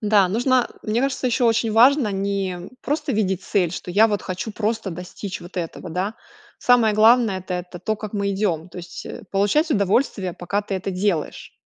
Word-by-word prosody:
Да, 205 -3 +4
нужно, 245 +5 +2
мне 220 +2 0
кажется, 270 -1 -1
ещё 245 0 +2
очень 225 -1 +2
важно 250 +1 +5
не, 195 -1 -1
м, 175 0 -9
просто 295 0 -2
видеть 190 -3 0
цель, 185 -5 +1
что 180 - -6
я 215 +5 +5
вот 205 -2 -1
хочу 185 +4 -4
просто 220 -1 -2
достичь 180 +3 -7
вот 175 +2 -12
этого, 170 -1 -5
да. 185 +6 -2 0.4
Самое 235 -4 +4
главное- 220 -2 +5
это 185 0 -5
это 180 0 -6
то, 215 +5 -2
как 215 -1 -7
мы 200 -1 -1
идём. 190 -5 -1
То 180 - -10
есть, 175 0 -8
э, - - -8
получать 205 - +2
удовольствие, 200 -3 +1
пока 180 +5 -2
ты 200 - -4
это 190 +1 -3
делаешь. 185 -4 -2
200 Hz, 195 wpm, -22 LUFS, 185-225 Hz, 0.4 s, важно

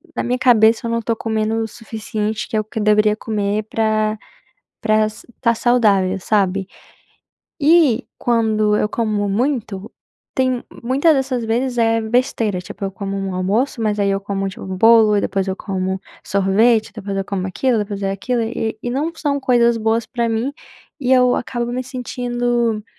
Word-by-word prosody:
na - - -1
minha 250 +1 0
cabeça 230 -2 +4
eu - - -2
não 230 0 0
tô 230 +1 -1
comendo 220 0 -1
o - - -3
suficiente, 220 -1 -4
que - - -5
é - - +3
o - - -1
que 220 +1 -6
eu - - -1
deveria 210 0 +4
comer 210 -1 -2
pra 215 -1 0 0.6
pra 215 -1 +1
s 215 0 -6
tá 235 -2 +3
saudável, 205 -6 +2
sabe. 195 -2 +1 0.9
E 290 -5 +4
quando 220 -3 +2
eu 210 - +1
como 210 -3 -1
muito, 220 -3 -2 0.5
tem 255 -2 +1 0.2
muitas 275 +6 +3
dessas 260 -3 -1
vezes 245 +2 -1
é 225 -1 +2
besteira, 220 -4 0
tipo, 200 +2 -9
eu 195 - -2
como 195 0 -5
um 195 -1 -3
almoço, 215 +7 0
mas 210 -1 0
aí 200 0 +2
eu 195 - 0
como, 195 -1 -3
tipo, 190 - -9
bolo 215 +3 +5
e - - +1
depois 195 -1 -1
eu 190 - -1
como 190 -1 -3 0.3
sorvete, 215 +4 +2
depois 200 -2 -5
eu 195 - -1
como 190 -2 -3
aquilo 240 +5 0
e 210 - +1
depois 200 -1 -6
é 195 - 0
aquilo 235 +5 -1
e 225 -1 -3
e 245 - -2
não 295 +6 -1
são 285 -3 -1
coisas 235 -3 +3
boas 225 +1 0
para 235 +1 -2
mim, 230 +5 -1 0.5
e 260 -1 0
eu 250 -1 +4
acabo 240 -1 -3
me 255 +1 -2
sentindo 240 -3 -2
220 Hz, 185 wpm, -19 LUFS, 205-240 Hz, 0.9 s, bolo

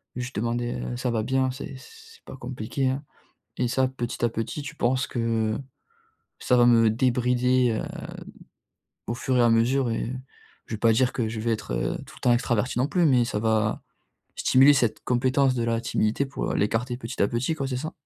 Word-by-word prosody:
Juste 125 +1 -5
demander, 120 +2 -1
heu, 120 - -4
«ça 125 0 -1
va 110 -2 0
bien?», 130 +2 +1
c'est 135 +1 -8
c 130 - -14 0.3
c'est - - -33
pas - - -9
compliqué, 130 +1 -3
hein, 135 +3 -3 0.5
et 125 - +1
ça, 130 +2 +1
petit 120 -2 -5
à 120 - +4
petit, 115 +6 -4
tu 140 - -8
penses 130 +3 0
que 115 -2 -1 0.8
ça 125 - +2
va 120 - +6
me 115 -2 +5
débrider, 125 +1 +2
heu, - - -4 1.2
au 115 - -2
fur 130 +1 0
et - - +5
à 120 - +5
mesure 120 +3 +2
et 115 +1 -2 0.6
je 110 - -4
vais - - -7
pas 115 -1 +4
dire 125 +3 +2
que 120 -3 -1
je 110 0 -4
vais 115 +2 0
être, 110 - -3
heu, - - -1
tout - - -14
le - - -17
temps 120 - +4
extraverti 120 0 0
non 130 +3 +2
plus, 175 +2 +2
mais 125 -5 +4
ça 110 -3 -2
va 110 -1 +1 0.6
stimuler 135 +3 +6
cette 120 -6 +1
compétence 130 +2 +2
de 120 -2 -1
la 115 0 0
timidité 110 +2 0
pour, 135 - -3
heu, - - -1
l'écarter 115 +4 0
petit 115 -2 -7
à 100 - +3
petit, 125 +7 -1
quoi, 135 -3 -3
c'est 130 - -2
ça? 155 +5 -4
120 Hz, 215 wpm, -25 LUFS, 115-130 Hz, 1.2 s, va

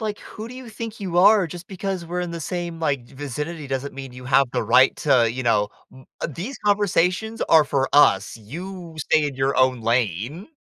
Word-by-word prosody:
Like, 215 -2 -3
who 220 +1 -9
do 250 - -10
you 255 -2 -9
think 225 0 -7
you 180 -3 -1
are? 195 +1 +6
Just 175 +2 -9
because 190 -2 -4
we're 175 +2 -4
in 175 - -3
the 170 - -5
same, 170 +1 -4
like, 140 -6 0
vicinity 145 +3 -6
doesn't 135 +1 -3
mean 135 -2 -8
you 125 0 -11
have 135 +2 +4
the - - 0
right 130 +1 +5
to, 125 -6 +3
you 130 +3 -4
know, 105 -3 +2 0.2
m 130 0 -15 0.2
uh, - - -1
these 195 - -6
conversations 205 +1 +1
are 160 - +7
for 135 -1 0
us. 110 -10 +4
You 170 - -8
stay 155 0 +2
in 140 - -5
your 135 +1 0
own 130 -1 +3
lane. 115 - -1
155 Hz, 210 wpm, -23 LUFS, 130-185 Hz, 0.2 s, are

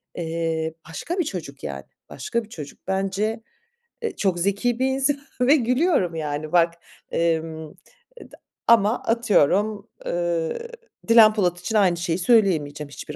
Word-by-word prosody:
Eee, 165 -1 -2 0.2
başka 340 - -5
bir - - +3
çocuk 160 - -7
yani, 70 -1 -5 0.3
başka 235 0 -3
bir 215 - -16
çocuk 150 -8 -9
bence, 195 +4 -1 0.6
eee, 460 - -3
çok 185 -3 0
zeki 200 +6 0
bir 260 - +2
insan 270 +2 +1 0.2
ve 265 +4 +6
gülüyorum 250 - +1
yani 150 -1 -4
bak. 170 -1 +4 0.4
Emm, 160 -1 -1 0.5
et - - -13 0.4
ama 225 0 +4
atıyorum, 210 -1 +2 0.2
ııı, 170 -2 -1 0.5
Dilan 225 -2 +7
Polat 180 -4 0
için 220 - -4
aynı 190 -5 +4
şeyi 170 -1 -1
söyleyemeyeceğim 165 -9 +2
hiçbir 135 - -8
190 Hz, 135 wpm, -23 LUFS, 165-230 Hz, 0.6 s, Dilan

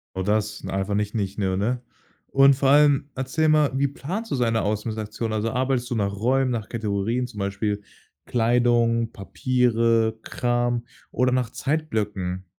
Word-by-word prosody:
Oh, 95 - -2
das 105 +2 -1
n - - -5
einfach 95 +1 -2
nicht 105 +1 -1
nicht, 100 -1 -2
ne? 100 +6 0 0.5
Und 135 0 +5
vor 135 0 +1
allem 145 0 +4
erzähl 135 +5 0
mal, 150 -2 +4
wie 140 +1 +2
planst 185 +11 -5
du - - +1
so 125 - +1
eine 115 -1 +1
Ausmistaktion? 110 +1 -3
Also, 110 +1 0
arbeitest 130 -1 0
du 120 - -1
nach 100 -2 0
Räumen, 130 +4 +1
nach 110 -3 -3
Kategorien, 110 +2 -1
zum 105 -4 -10
Beispiel 100 +1 -2 0.4
Kleidung, 115 -1 +2
Papiere, 115 0 +1
Kram 120 -1 -1 0.3
oder 125 +1 +2
nach 125 -2 0
Zeitblöcken? 105 - -2
115 Hz, 155 wpm, -24 LUFS, 105-130 Hz, 0.5 s, Und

